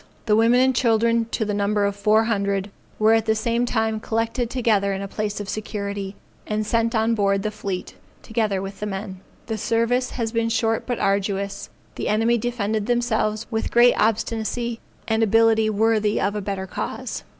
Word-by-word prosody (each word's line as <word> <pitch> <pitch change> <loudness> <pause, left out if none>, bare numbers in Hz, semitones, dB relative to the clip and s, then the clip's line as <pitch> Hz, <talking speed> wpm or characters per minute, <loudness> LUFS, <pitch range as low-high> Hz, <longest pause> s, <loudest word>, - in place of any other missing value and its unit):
The 210 -2 +3
women 230 +3 +4
and 260 0 +3
children 230 -1 +2
to 225 -1 -2
the 205 - -2
number 205 0 +1
of 200 0 -1
four 215 +2 +3
hundred, 200 -3 -1 0.3
were 220 +1 +4
at 225 0 +2
the 220 - +3
same 235 +2 0
time 220 -2 0
collected 230 +2 -1
together 215 -6 +1
in 195 - -4
a - - -4
place 210 +1 -3
of 205 - -5
security, 200 -2 -4 0.3
and 215 0 -1
sent 230 +2 +1
on 220 +1 +2
board 200 -2 +1
the 215 - -1
fleet, 200 -3 -5 0.3
together 215 -4 -1
with 195 0 -7
the 210 - -3
men. 195 -1 -5 0.3
The 220 -1 -4
service 230 +4 +1
has 230 -3 -3
been 230 0 0
short 225 0 0
but 245 -2 -1
arduous; 200 0 -1 0.3
the - - -3
enemy 225 +3 +2
defended 220 -2 -2
themselves 225 -3 0
with 220 -1 -1
great 240 +1 +6
obstinacy 225 +2 -1 0.3
and 220 0 +1
ability 225 0 +4
worthy 215 0 +2
of 200 +2 0
a 210 - -2
better 195 -1 -3
cause. 190 - -5
220 Hz, 185 wpm, -23 LUFS, 205-230 Hz, 0.3 s, great